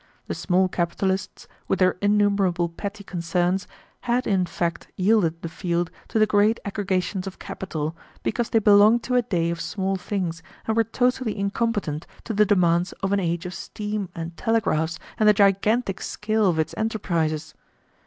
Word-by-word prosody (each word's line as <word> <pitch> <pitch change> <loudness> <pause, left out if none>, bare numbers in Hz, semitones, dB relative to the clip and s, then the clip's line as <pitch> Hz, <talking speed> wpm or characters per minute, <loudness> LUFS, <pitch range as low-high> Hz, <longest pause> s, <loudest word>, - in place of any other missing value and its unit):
The - - -3
small 185 +1 +2
capitalists, 190 +2 -2 0.2
with - - +1
their 185 0 +3
innumerable 200 -4 +2
petty 200 +4 -6
concerns, 180 +1 -1 0.3
had 245 0 0
in 190 -3 +1
fact 170 -1 -2
yielded 185 -4 +2
the - - -2
field 170 0 -2 0.2
to - - -2
the 215 - +6
great 210 +2 +3
aggregations 190 -2 -1
of 190 - -7
capital, 160 -4 -4 0.3
because 240 -2 -1
they - - +2
belonged 215 +2 +6
to 255 - -3
a 250 - +5
day 170 -6 0
of 170 0 -4
small 195 -1 -1
things 180 -3 -3 0.2
and 220 - 0
were 230 - +4
totally 245 0 0
incompetent 200 -6 -1 0.2
to 225 - -4
the 210 0 +4
demands 175 -3 +3
of 195 +1 +1
an 200 - +3
age 170 -1 -1
of 180 - -5
steam 210 -2 -4
and 165 0 -6
telegraphs 170 -8 +1 0.2
and 215 -1 +6
the - - +7
gigantic 200 +1 +2
scale 215 0 0
of 170 -3 +2
its 160 0 0
enterprises. 170 -8 -1
195 Hz, 165 wpm, -24 LUFS, 175-210 Hz, 0.3 s, the